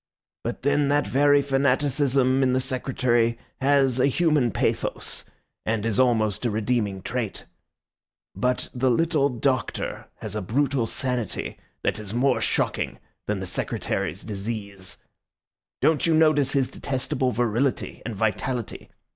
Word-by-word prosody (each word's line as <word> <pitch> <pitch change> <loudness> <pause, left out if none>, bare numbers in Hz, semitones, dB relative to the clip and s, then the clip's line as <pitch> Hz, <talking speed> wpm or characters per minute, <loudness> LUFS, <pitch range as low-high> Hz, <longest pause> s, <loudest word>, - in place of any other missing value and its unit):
But - - -4
then 145 +1 +3
that 145 +1 +2
very 145 +1 +4
fanaticism 135 -1 +2
in 130 -1 +3
the 130 - +3
Secretary 125 -3 +1 0.2
has 135 -2 +3
a 130 - +5
human 150 -3 +2
pathos, - - -2 0.4
and 110 -1 -1
is 115 -1 0
almost 110 -5 +2
a 120 - +1
redeeming 105 -3 -1
trait. 115 -4 -3 0.9
But 125 0 0
the 130 +1 +1
little 150 +2 +2
Doctor 130 +1 -2
has 105 -1 -7
a 105 - -1
brutal 130 +4 0
sanity 125 -3 -3 0.2
that - - 0
is 105 +1 -7
more 135 +3 +2
shocking - - 0 0.3
than 105 -2 -1
the - - -3
Secretary's 90 -1 -2
disease. 100 -2 -6 0.8
Don't 160 +1 +3
you 165 - +4
notice 155 -3 +4
his 135 -3 +1
detestable 130 0 -1
virility 120 +3 0
and 115 -1 -5
vitality. 110 +2 -2
125 Hz, 130 wpm, -25 LUFS, 110-140 Hz, 0.9 s, a